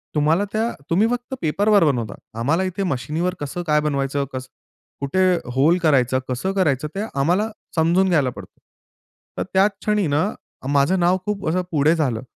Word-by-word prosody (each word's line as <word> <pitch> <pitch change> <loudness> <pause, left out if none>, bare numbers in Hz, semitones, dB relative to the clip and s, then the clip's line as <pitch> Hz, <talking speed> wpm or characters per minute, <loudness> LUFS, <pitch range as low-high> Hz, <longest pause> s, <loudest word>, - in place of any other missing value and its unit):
तुम्हाला 155 +5 +3
त्या 225 +2 0 0.2
तुम्ही 195 +7 +3
फक्त 245 +2 -4
पेपरवर 200 +5 +3
बनवता, 120 -6 0 0.3
आम्हाला 155 +10 +1
इथे 190 +1 -2
मशिनीवर 155 +3 -1
कसं 145 +5 -4
काय 150 0 +4
बनवायचं, 140 -1 -1
कसं 130 0 -5 0.5
कुठे 140 +7 0 0.3
होल 155 +7 +4
करायचं, 130 -5 +3
कसं 130 +10 -1
करायचं? 155 -7 +1
ते 195 - -2
आम्हाला 175 +10 +1 0.3
समजून 175 +4 +3
घ्यायला 150 -7 +2
पडतं. - - -11 0.8
तर - - 0
त्याच 195 +2 +4
क्षणी 210 -4 +1
ना, 150 +7 +1 0.4
माझं 145 +6 +2
नाव 175 +2 +3
खूप 210 -2 -3
अ, - - +3
असं 180 +3 +1
पुढे 155 +1 +3
झालं, 130 -9 -1
160 Hz, 165 wpm, -21 LUFS, 140-190 Hz, 0.8 s, काय